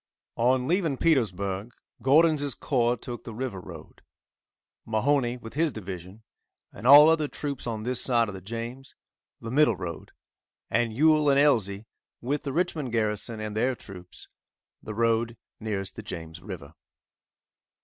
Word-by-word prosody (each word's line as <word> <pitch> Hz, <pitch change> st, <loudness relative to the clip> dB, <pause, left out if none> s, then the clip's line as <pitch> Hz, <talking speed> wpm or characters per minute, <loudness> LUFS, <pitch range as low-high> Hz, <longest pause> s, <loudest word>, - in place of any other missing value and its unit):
On 125 Hz, +2 st, +2 dB
leaving 165 Hz, -5 st, +1 dB
Petersburg, 105 Hz, -, 0 dB, 0.3 s
Gordon's 145 Hz, +2 st, +4 dB
corps 120 Hz, -3 st, +1 dB
took 120 Hz, +2 st, -7 dB
the 115 Hz, -, -8 dB
river 120 Hz, -5 st, -4 dB
road; 85 Hz, -4 st, -12 dB, 0.8 s
Mahone, 120 Hz, +2 st, +1 dB
with 115 Hz, -, -9 dB
his 160 Hz, +1 st, +1 dB
division, 95 Hz, -1 st, -8 dB, 0.5 s
and 110 Hz, +5 st, -5 dB
all 145 Hz, +3 st, +10 dB
other 160 Hz, -2 st, +3 dB
troops 140 Hz, -4 st, -5 dB
on 110 Hz, -2 st, -3 dB
this 125 Hz, +1 st, -1 dB
side 120 Hz, -3 st, +2 dB
of 105 Hz, -, -6 dB
the 95 Hz, -, -8 dB
James, 115 Hz, +6 st, -7 dB, 0.4 s
the 115 Hz, -, -7 dB
middle 135 Hz, -4 st, +4 dB
road, 85 Hz, -2 st, -7 dB, 0.6 s
and 115 Hz, +1 st, +1 dB
Ewell 150 Hz, +4 st, +4 dB
and 140 Hz, 0 st, +4 dB
Elzey, 110 Hz, -8 st, +2 dB, 0.3 s
with 140 Hz, +4 st, -2 dB
the 140 Hz, -, -4 dB
Richmond 160 Hz, -5 st, -1 dB
garrison, 110 Hz, 0 st, -1 dB
and 105 Hz, -1 st, -5 dB
other 125 Hz, +4 st, +1 dB
troops, 90 Hz, -5 st, -12 dB, 0.5 s
the 110 Hz, -, -7 dB
road 115 Hz, 0 st, +1 dB, 0.2 s
nearest 100 Hz, -3 st, -4 dB
the -, -, -6 dB
James 85 Hz, -4 st, -7 dB
river. 85 Hz, -6 st, -9 dB
115 Hz, 145 wpm, -27 LUFS, 105-140 Hz, 0.8 s, all